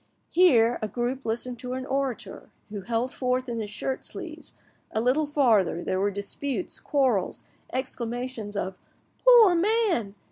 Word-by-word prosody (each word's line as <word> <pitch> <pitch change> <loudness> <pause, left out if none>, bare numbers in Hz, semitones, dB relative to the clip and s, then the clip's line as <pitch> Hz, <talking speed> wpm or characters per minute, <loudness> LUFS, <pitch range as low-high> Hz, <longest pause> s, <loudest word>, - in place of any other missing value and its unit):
Here, 245 -10 +5
a 215 - -1
group 245 +4 -3
listened 240 +2 -3
to 250 +1 -4
an 260 0 -4
orator 270 -3 -3 0.2
who 205 -1 -5
held 235 +5 -1
forth 255 0 -1
in 235 -1 -3
his 210 -2 -4
shirt 260 +5 -3
sleeves, - - -6 0.4
a 220 - 0
little 260 +6 +2
farther 220 - +2
there 185 - -1
were 200 +1 +2
disputes, 245 - -3
quarrels, 260 - 0 0.3
exclamations 245 -3 -3
of 190 -2 -3 0.4
"Poor 475 -6 +8
man!" 350 - +1
250 Hz, 145 wpm, -26 LUFS, 215-275 Hz, 0.4 s, Poor